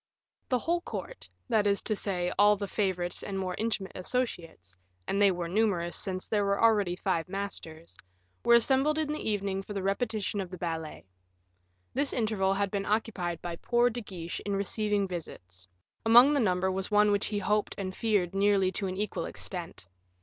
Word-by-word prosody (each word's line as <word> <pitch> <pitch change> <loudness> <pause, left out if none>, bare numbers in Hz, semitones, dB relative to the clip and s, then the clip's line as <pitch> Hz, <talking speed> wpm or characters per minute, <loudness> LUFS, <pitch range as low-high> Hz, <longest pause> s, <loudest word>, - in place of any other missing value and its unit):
The 255 - +3
whole 340 +8 0
of - - -27
the - - -8
court, - - -7 0.2
that 220 -4 +2
is 200 0 +3
to 215 - 0
say, 180 -3 -1
all 205 0 +7
the 200 0 -4
favorites 185 -4 -1
and 195 - -4
more 185 -1 -2
intimate 215 -3 -1
associates, 175 - -3 0.3
and 200 - 0
they 200 - +7
were 175 -2 -2
numerous, 180 -3 0
since 185 -2 -3
there 210 -2 +1
were 200 0 +1
already 210 -6 +3
five 180 -3 -1
masters, 170 -5 -6 0.5
were 235 - +6
assembled 270 +5 +3
in 310 -2 0
the 305 - -4
evening 200 -2 -1
for 205 - -8
the 195 -2 -3
repetition 205 0 -1
of 185 - -6
the 185 - -8
ballet. 165 - -5 0.9
This 275 +2 0
interval 210 -5 +1
had 200 -1 0
been 200 -1 -2
occupied 195 -6 -1
by 170 -1 -4
poor 240 +4 +2
De 240 +1 -5
Guiche 175 -5 -6
in 200 -1 -3
receiving 205 0 0
visits; 90 - -8 0.4
among 240 +6 +7
the 290 - +2
number 190 -4 +1
was 190 0 -3
one 210 0 +4
which 205 0 +1
he 210 - -2
hoped 210 +1 0
and 185 -1 -4
feared 205 -6 +1
nearly 195 -1 +3
to 195 +1 -2
an 185 0 -4
equal 210 +1 -2
extent. 175 - -6
200 Hz, 190 wpm, -29 LUFS, 185-215 Hz, 0.9 s, all